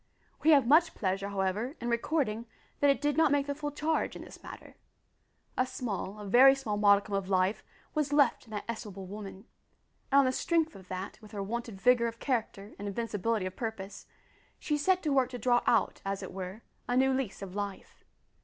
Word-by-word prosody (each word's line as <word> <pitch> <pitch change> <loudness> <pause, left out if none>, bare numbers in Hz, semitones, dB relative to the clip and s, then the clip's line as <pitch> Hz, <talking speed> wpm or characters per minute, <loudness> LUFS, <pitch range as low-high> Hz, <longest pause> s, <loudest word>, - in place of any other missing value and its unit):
We 315 - +3
have 285 -5 +6
much 320 +6 +4
pleasure, 195 0 -1
however, 200 - -1
in 240 - -4
recording, 235 -2 0 0.3
that 285 - +4
it 275 - +3
did 295 -1 0
not 320 -3 +4
make 285 -1 +2
the 285 - -2
full 295 +1 -4
charge 305 +2 -1
in - - -8
this - - -13
matter. - - -11 0.8
A 255 - +1
small, 215 -5 -4
a 210 - -7
very 260 +7 +7
small 250 -6 -3
modicum 205 0 +4
of 195 -1 -1
life 190 +2 +1 0.3
was 300 -2 0
left 285 -5 +3
in - - -19
that 210 -2 -4
estimable 205 -4 -6
woman, 200 +1 -8 0.7
and 275 - +5
on - - +2
the 255 - +2
strength 325 +1 0
of 190 -2 -13
that, 185 +4 -6
with 215 -1 -14
her 200 -1 -3
wonted 225 -1 -5
vigour 245 +1 +4
of 230 0 -6
character 220 -6 -3
and 205 - -5
invincibility 220 0 -1
of 185 0 -5
purpose, 220 -4 -6 0.5
she 300 - -1
set 365 +5 +2
to 300 -3 +1
work 260 -2 +3
to 250 - -6
draw 240 +1 +3
out, 230 -3 +2
as 195 0 -3
it - - -7
were, 190 +3 -6 0.2
a 245 - +1
new 265 +1 +4
lease 255 -7 -3
of 185 -2 -8
life. 200 -1 -6
230 Hz, 205 wpm, -30 LUFS, 200-270 Hz, 0.8 s, very